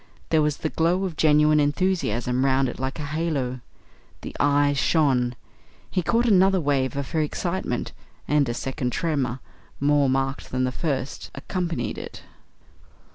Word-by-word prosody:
There 160 Hz, -1 st, +3 dB
was 150 Hz, -1 st, 0 dB
the 160 Hz, -, -2 dB
glow 175 Hz, +5 st, +1 dB
of 180 Hz, -4 st, -4 dB
genuine 150 Hz, 0 st, +4 dB
enthusiasm 145 Hz, -, 0 dB
round 135 Hz, 0 st, +2 dB
it 120 Hz, -, -6 dB
like 130 Hz, +3 st, -3 dB
a 150 Hz, -, -4 dB
halo. 145 Hz, -5 st, -2 dB, 0.6 s
The -, -, -8 dB
eyes 145 Hz, 0 st, +3 dB
shone. 130 Hz, -6 st, +2 dB, 0.6 s
He 185 Hz, -, +1 dB
caught 230 Hz, +7 st, +1 dB
another 195 Hz, -3 st, +4 dB
wave 140 Hz, -5 st, 0 dB
of 140 Hz, -1 st, -4 dB
her 160 Hz, -, +1 dB
excitement, 170 Hz, -3 st, -2 dB, 0.4 s
and 145 Hz, -3 st, +2 dB
a 120 Hz, -, -2 dB
second 125 Hz, -1 st, -3 dB
tremor, 135 Hz, -6 st, -1 dB, 0.4 s
more 145 Hz, -1 st, +3 dB
marked 135 Hz, +1 st, -1 dB
than 130 Hz, 0 st, -1 dB
the 130 Hz, -, 0 dB
first, 135 Hz, -2 st, -3 dB
accompanied 165 Hz, -, -3 dB
it. -, -, -9 dB
145 Hz, 150 wpm, -24 LUFS, 130-165 Hz, 0.6 s, genuine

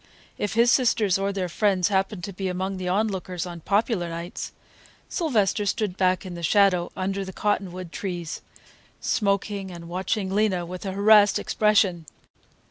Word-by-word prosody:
If 205 Hz, 0 st, -2 dB
his 235 Hz, +1 st, +5 dB
sisters 220 Hz, -7 st, +3 dB
or 195 Hz, +1 st, 0 dB
their 190 Hz, -2 st, -2 dB
friends 190 Hz, 0 st, +1 dB
happened 195 Hz, -1 st, 0 dB
to 200 Hz, -, -5 dB
be 190 Hz, +1 st, -3 dB
among 190 Hz, +1 st, -2 dB
the 185 Hz, -1 st, -4 dB
onlookers 185 Hz, -3 st, -1 dB
on 175 Hz, -1 st, -7 dB
"popular 200 Hz, 0 st, 0 dB
nights," 170 Hz, +2 st, -6 dB, 0.6 s
Sylvester 220 Hz, -, +1 dB
stood 205 Hz, -2 st, -1 dB
back 185 Hz, 0 st, +1 dB
in 185 Hz, -, -6 dB
the 170 Hz, -, -7 dB
shadow 185 Hz, 0 st, +3 dB
under 195 Hz, +1 st, -2 dB
the 190 Hz, -, -7 dB
cottonwood 185 Hz, -3 st, -2 dB
trees, 175 Hz, -7 st, -5 dB, 0.6 s
smoking 200 Hz, -1 st, -1 dB
and 170 Hz, -2 st, -9 dB
watching 190 Hz, +2 st, -2 dB
Lena 195 Hz, -4 st, +1 dB
with 180 Hz, +3 st, -7 dB
a 190 Hz, -, -3 dB
harassed 205 Hz, 0 st, +6 dB
expression. 195 Hz, -6 st, +2 dB
195 Hz, 155 wpm, -25 LUFS, 180-205 Hz, 0.6 s, harassed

